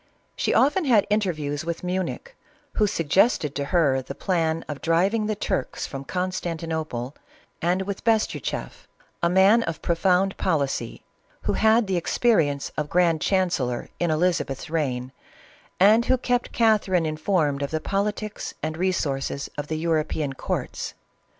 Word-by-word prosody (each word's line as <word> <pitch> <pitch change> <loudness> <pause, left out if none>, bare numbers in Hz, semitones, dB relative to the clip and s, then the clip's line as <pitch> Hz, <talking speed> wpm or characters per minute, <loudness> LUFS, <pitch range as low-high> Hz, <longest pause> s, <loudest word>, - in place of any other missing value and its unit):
She - - 0
often 300 +6 +3
had 230 -7 +4
interviews 155 -9 -1
with 170 +1 -4
Munich, 185 - -3 0.4
who 210 - +2
suggested 165 - +2
to 140 -1 -2
her 140 -5 +2
the 135 +2 -8
plan 165 -3 0
of 150 -2 -6
driving 195 +7 +2
the 215 - -1
Turks 135 - -2
from 135 0 -7
Constantinople, 165 -8 -3 0.5
and 180 +3 +1
with 200 0 -5
Bestuchoff, 225 -2 -1 0.3
a 170 - +3
man 190 +6 +5
of 165 -8 -4
pro 170 - +2
found 190 +2 +2
policy, 140 -9 -1 0.4
who - - 0
had 220 +1 +4
the 190 -2 0
experience 165 - +1
of 150 -1 -2
grand 170 -3 +2
chan 185 -2 +2
cellor 125 -6 -2
in 175 - +1
Elizabeth's 155 -3 0
reign, 130 -6 -1 0.7
and 215 +5 +6
who 260 - +3
kept 245 0 -1
Catherine 205 -7 +2
in 155 0 -2
formed 155 -4 0
of 140 - -1
the 160 - -1
politics 205 +4 -3
and 155 0 -2
resources 140 -7 -1
of 145 0 -4
the 155 - -2
European 155 -3 -1
courts. - - -4
170 Hz, 150 wpm, -24 LUFS, 150-195 Hz, 0.7 s, and